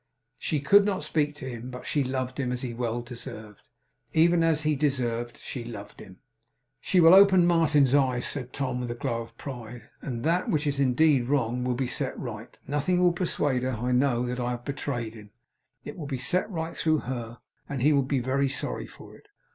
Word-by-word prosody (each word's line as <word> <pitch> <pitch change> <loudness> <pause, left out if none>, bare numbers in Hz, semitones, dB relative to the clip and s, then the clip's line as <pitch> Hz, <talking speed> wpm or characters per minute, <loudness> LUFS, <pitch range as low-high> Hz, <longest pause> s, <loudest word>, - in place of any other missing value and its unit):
She 150 - -1
could 175 +9 +6
not 195 -5 -1
speak 150 -1 0
to 150 - -8
him, 120 0 -6
but 125 0 -8
she 145 - +1
loved 130 0 -3
him, 125 -2 -1
as 125 +1 -3
he 120 -2 -3
well 120 0 -2
deserved. 110 -4 -9 0.5
Even 170 +1 +4
as 160 -2 +2
he 155 0 +2
deserved, 120 -5 -1
she 125 - -6
loved 110 -4 -9
him. 95 -1 -12 0.6
'She 185 - +1
will 165 0 +8
open 190 -2 +7
Martin's 155 -6 +3
eyes,' 130 -3 +2
said 130 -3 -3
Tom, 130 -3 -2
with 125 - -4
a 120 - -3
glow 115 0 -2
of 115 - -12
pride, 120 -4 -8
'and 120 -4 -5
that 170 +4 +1
(which 150 -1 +1
is 140 -1 -1
indeed 135 -1 +3
wrong) 125 -3 0
will 125 -1 0
be 130 +2 -1
set - - -2
right. - - -7
Nothing 150 +6 0
will 180 -1 +4
persuade 150 -7 0
her, 130 0 -1
I 120 +3 -2
know, 125 -1 +2
that 125 +1 -3
I 120 0 -1
have 120 0 -5
betrayed 135 -5 -3
him. 105 -2 -13 0.6
It - - -7
will 155 -5 -6
be 135 -2 -3
set 180 - 0
right 165 -4 -4
through 155 -2 +1
her, 120 -2 -5 0.3
and 135 -4 -3
he 150 +2 +5
will 140 - +4
be 135 +1 -1
very 135 +2 +1
sorry - - -3
for - - -14
it. - - -20
130 Hz, 210 wpm, -27 LUFS, 120-150 Hz, 0.6 s, will